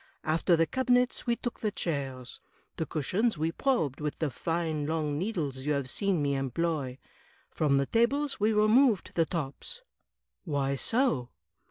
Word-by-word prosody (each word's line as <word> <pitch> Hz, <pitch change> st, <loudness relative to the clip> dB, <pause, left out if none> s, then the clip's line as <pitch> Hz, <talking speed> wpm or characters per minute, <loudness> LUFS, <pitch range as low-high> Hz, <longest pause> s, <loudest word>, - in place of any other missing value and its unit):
After 165 Hz, +3 st, +2 dB
the 165 Hz, 0 st, +3 dB
cabinets 250 Hz, +2 st, +1 dB
we 235 Hz, -, +3 dB
took 240 Hz, 0 st, -5 dB
the 215 Hz, -, 0 dB
chairs. 135 Hz, -9 st, -4 dB, 0.4 s
The 160 Hz, -, -2 dB
cushions 185 Hz, -, 0 dB
we 160 Hz, +2 st, 0 dB
probed 165 Hz, -, 0 dB
with 150 Hz, -1 st, -2 dB
the 155 Hz, -4 st, -1 dB
fine 160 Hz, -1 st, -2 dB
long 155 Hz, -2 st, -1 dB
needles 165 Hz, -9 st, -2 dB
you 145 Hz, +3 st, -1 dB
have 140 Hz, -3 st, -2 dB
seen 190 Hz, -3 st, +1 dB
me 140 Hz, -1 st, +1 dB
employ. 135 Hz, 0 st, -1 dB, 0.5 s
From 145 Hz, -3 st, +2 dB
the 140 Hz, -, +2 dB
tables 275 Hz, -, +1 dB
we 210 Hz, +2 st, +3 dB
removed 215 Hz, +1 st, +4 dB
the 165 Hz, -2 st, +2 dB
tops." 170 Hz, -, -4 dB, 0.6 s
"Why 140 Hz, -5 st, 0 dB
so?" 150 Hz, -, +1 dB
165 Hz, 155 wpm, -29 LUFS, 140-220 Hz, 0.6 s, removed